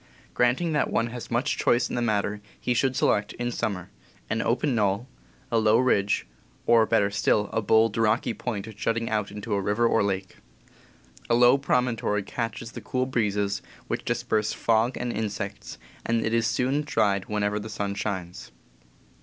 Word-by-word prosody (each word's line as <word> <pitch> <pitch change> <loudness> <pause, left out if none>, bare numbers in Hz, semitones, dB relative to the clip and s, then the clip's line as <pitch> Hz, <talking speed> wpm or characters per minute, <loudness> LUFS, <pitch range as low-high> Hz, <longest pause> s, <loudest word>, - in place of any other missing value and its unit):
Granting 125 +8 +2
that 150 - +1
one 115 0 0
has 120 -1 -7
much 120 +5 0
choice 120 +1 +3
in - - -7
the 120 - 0
matter, 105 -2 0 0.2
he 125 - 0
should 130 +2 +1
select, 105 -3 +1
in 120 0 -3
summer, 100 -7 -3 0.4
an 115 - +1
open 130 +5 +1
knoll, 105 +1 +1 0.4
a 115 - +3
low 110 0 +4
ridge, 105 -5 +2 0.4
or, 115 -2 +5
better 105 -3 +2
still, 105 +1 +1
a 115 - +1
bold, 110 +1 +3
rocky 115 +1 +2
point 110 -1 -5
jutting 115 +2 -1
out 105 -2 0
into 105 +1 -5
a 100 - +1
river 105 +4 +1
or - - +3
lake. 95 -1 -2 0.9
A 115 - +4
low 120 +2 +6
promontory 125 -6 0
catches 115 +2 -4
the - - -8
cool 130 0 -1
breezes, 105 -5 0 0.3
which - - -3
disperse 105 0 0
fog 115 +2 +1
and 120 0 -2
insects, 105 -1 -4 0.3
and 115 0 0
it 110 - -1
is 115 -1 +2
soon 130 +5 +1
dried 105 -9 +1
whenever 105 0 -1
the 110 +1 -7
sun 100 -1 -3
shines. 95 -4 -5
110 Hz, 170 wpm, -26 LUFS, 105-120 Hz, 0.9 s, low